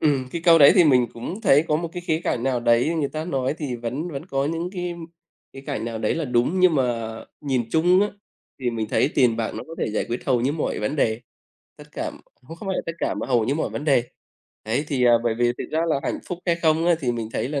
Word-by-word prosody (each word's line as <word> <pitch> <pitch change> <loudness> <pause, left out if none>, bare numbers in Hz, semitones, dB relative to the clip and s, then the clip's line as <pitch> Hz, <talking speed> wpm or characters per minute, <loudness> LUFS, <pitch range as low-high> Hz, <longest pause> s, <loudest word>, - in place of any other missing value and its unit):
Ừm, 135 -4 +1
cái 170 - -3
câu 165 -1 +7
đấy 140 - +8
thì 180 -3 +6
mình 125 -5 +4
cũng 175 - -6
thấy 150 -7 +4
có 150 - +3
một 170 +1 -3
cái 175 - -5
khía 160 -1 +1
cạnh 120 - -1
nào 130 -2 0
đấy 120 +7 +3
người 140 -2 0
ta 155 +1 -5
nói 135 -4 -1
thì 135 -6 -3
vẫn 130 +9 -4
vẫn 140 +4 -6
có 135 -4 -1
những 165 +3 -3
cái 175 -2 -4 0.6
khía 135 - -9
cạnh 140 -4 -4
nào 115 -1 -4
đấy 110 - 0
là 165 -2 -2
đúng. 125 +9 +1
Nhưng 180 -3 +5
mà 115 -4 -1 0.3
nhìn 130 -5 -1
chung 175 +4 +4
á 205 - +2 0.5
thì 125 -1 0
mình 110 -2 -3
thấy - - +2
tiền 120 -4 +3
bạc 115 -1 -2
nó - - -5
có 165 - -9
thể - - -1
giải 105 - -1
quyết 120 +1 -3
hầu 125 -3 +2
như 135 +4 +1
mọi 155 - -2
vấn 105 +8 -2
đề, 110 -3 +1 0.6
tất - - -12
cả - - -3 0.2
cũng 160 +6 -12
không 195 - -7
phải 190 - 0
là - - -2
tất 165 - -2
cả - - -1
mà - - -4
hầu 120 -4 +2
như 135 +5 0
mọi 160 - -2
vấn 145 - -5
đề. 135 -5 +3 0.6
Đấy, 120 +7 -1
thì, 130 -3 +1
à, 120 - +6
bởi 115 -2 +1
vì 120 +1 +2
thực - - -3
ra 160 - 0
là 140 -3 +1
hạnh - - -2
phúc 175 - -5
hay 170 -1 +2
không 165 0 +2
á 175 - +5
thì 125 -3 0
mình 115 -2 -4
thấy 125 - -2
là 145 -2 -2
140 Hz, 275 wpm, -23 LUFS, 120-165 Hz, 0.6 s, đấy